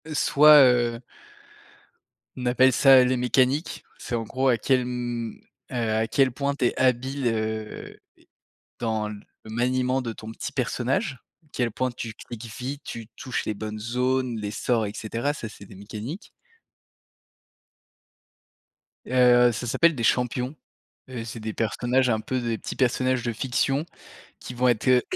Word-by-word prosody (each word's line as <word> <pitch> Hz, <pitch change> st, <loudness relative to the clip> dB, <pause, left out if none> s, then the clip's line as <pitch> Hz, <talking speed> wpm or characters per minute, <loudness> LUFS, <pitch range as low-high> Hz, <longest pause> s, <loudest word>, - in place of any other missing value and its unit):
Soit, 150 Hz, -1 st, +6 dB
heu 120 Hz, -2 st, +2 dB, 1.4 s
on 125 Hz, -, -5 dB
appelle 125 Hz, +2 st, +4 dB
ça 135 Hz, 0 st, +7 dB
les 125 Hz, 0 st, +1 dB
mécaniques, 130 Hz, +5 st, +1 dB
c'est 120 Hz, -, -4 dB
en 115 Hz, -, -2 dB
gros 130 Hz, +4 st, -1 dB
à 125 Hz, -3 st, +4 dB
quel, 125 Hz, +2 st, +1 dB
mmh, 120 Hz, -2 st, -4 dB, 0.4 s
heu, -, -, -5 dB, 0.2 s
à 110 Hz, +1 st, +1 dB
quel 135 Hz, +3 st, +2 dB
point 140 Hz, +3 st, -2 dB
tu 130 Hz, -, 0 dB
es -, -, 0 dB
habile, 130 Hz, +1 st, +1 dB
heu, 110 Hz, -1 st, -3 dB, 0.8 s
dans 110 Hz, -2 st, -1 dB
le 105 Hz, -1 st, -8 dB, 0.3 s
maniement 125 Hz, +3 st, 0 dB
de 115 Hz, -2 st, -4 dB
ton 110 Hz, 0 st, -9 dB
petit 115 Hz, -, -6 dB
personnage, 130 Hz, -, -1 dB, 0.2 s
à -, -, -30 dB
quel 120 Hz, -3 st, -1 dB
point 130 Hz, +3 st, -1 dB
tu 115 Hz, -2 st, -7 dB
cliques 120 Hz, 0 st, -9 dB
vite, 140 Hz, +3 st, -5 dB
tu 115 Hz, -2 st, -7 dB
touches 130 Hz, -, -3 dB
les 110 Hz, -, -2 dB
bonnes 110 Hz, +1 st, -6 dB
zones, 125 Hz, +2 st, 0 dB
les 105 Hz, -1 st, -4 dB
sorts 115 Hz, -1 st, 0 dB
et 100 Hz, -, -5 dB
cetera, 115 Hz, +6 st, -2 dB
ça 120 Hz, -, -6 dB
c'est 105 Hz, -, -13 dB
des 100 Hz, -, -14 dB
mécaniques. 110 Hz, -, -8 dB, 2.8 s
Heu, 125 Hz, -1 st, +5 dB
ça 120 Hz, +2 st, -5 dB
s'appelle 165 Hz, +7 st, +3 dB
des 120 Hz, -, -4 dB
champions, 125 Hz, +3 st, 0 dB, 0.5 s
heu, 125 Hz, -3 st, -5 dB
c'est 115 Hz, 0 st, -7 dB
des 110 Hz, 0 st, -5 dB
personnages 125 Hz, +4 st, +1 dB
un 110 Hz, -, +1 dB
peu 130 Hz, +4 st, -2 dB
des 115 Hz, -2 st, -2 dB
petits -, -, -6 dB
personnages 130 Hz, -1 st, +1 dB
de 120 Hz, 0 st, -2 dB
fiction 135 Hz, +5 st, 0 dB, 0.5 s
qui -, -, -8 dB
vont 125 Hz, +1 st, +2 dB
être, 120 Hz, 0 st, +1 dB
heu, 125 Hz, -1 st, +5 dB
125 Hz, 160 wpm, -25 LUFS, 115-130 Hz, 2.8 s, ça